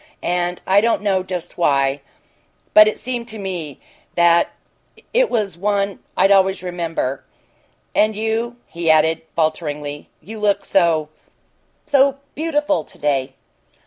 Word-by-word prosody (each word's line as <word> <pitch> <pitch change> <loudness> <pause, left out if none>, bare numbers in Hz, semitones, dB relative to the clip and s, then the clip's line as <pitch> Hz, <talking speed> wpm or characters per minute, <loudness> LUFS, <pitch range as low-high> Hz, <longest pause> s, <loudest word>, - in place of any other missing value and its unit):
And 175 0 -1
I 195 +2 +4
don't 230 -1 +1
know 195 -2 +2
just 185 -2 -6
why 140 -3 +2 0.7
but 215 0 +9
it's 215 - -1
seemed 245 -2 -4
to 220 -2 -7
me 175 -8 -5 0.4
that 170 0 +4 0.6
it - - +3
was 205 -7 -2
one 200 0 0 0.2
I'd 195 +2 +4
always 190 -1 +3
remember. 165 -7 -3 0.7
And 215 0 +2
you," 225 +2 -2
he 170 -1 -3
added, 160 +1 +4
falteringly, 150 -2 -2
"you 220 +2 -9
look 200 -1 +1
so 165 -5 +2 0.8
so 275 -2 +3 0.2
beautiful 300 -1 0
to - - -15
day!" 135 -2 -1
185 Hz, 130 wpm, -20 LUFS, 160-215 Hz, 0.8 s, but